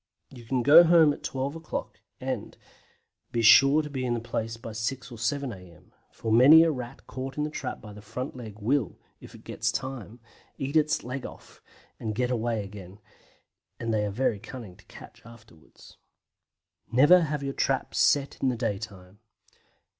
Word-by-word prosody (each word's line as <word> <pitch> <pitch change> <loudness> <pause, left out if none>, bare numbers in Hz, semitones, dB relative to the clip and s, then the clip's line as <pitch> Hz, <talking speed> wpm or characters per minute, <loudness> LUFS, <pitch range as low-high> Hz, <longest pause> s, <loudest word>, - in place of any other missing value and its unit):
You 120 -3 -13
can 125 +1 -1
go 155 +6 +9
home 165 -3 +5
at - - -11
12 135 +3 -3
o'clock, 160 -1 -6 0.2
and - - -5 0.7
be 115 - -1
sure 135 +7 +7
to 150 - -7
be 130 -2 -3
in 120 -1 0
the - - -2
place 115 0 -4
by 115 0 -8
6 120 +4 -4
or 120 - -9
7 135 +2 -2
a.m., 90 -4 -16 0.2
for 110 - -5
many 140 +8 +8
a 165 - +2
Rat 125 -2 -8
caught 130 +1 -7
in 150 - 0
the 150 - -3
trap - - -5
by 105 -1 -11
the 105 - -12
front 125 +5 -6
leg 110 -5 -9
will, 115 +1 -1 0.2
if - - -13
it - - -15
gets 115 0 -2
time, 125 -3 -6 0.4
eat 135 +3 -4
off - - +7
its 155 +1 0
leg 130 +1 -5 0.7
and 110 -2 -4
get 125 +2 0
away 115 -2 -1
again, 100 -1 -11 0.8
and 115 -1 -2
they 105 -1 +1
are 105 - -1
very 110 0 -1
cunning 110 -5 -10
to - - -21
catch - - -14
afterwards. 110 -8 -17 0.9
NEVER 150 +9 +6
HAVE 150 -1 -3
YOUR 135 0 -3
TRAPS 135 -1 -1
SET 140 -1 +2
IN 135 - +2
THE 125 - -2
DAYTIME. 100 -4 -5
125 Hz, 185 wpm, -27 LUFS, 110-135 Hz, 0.9 s, go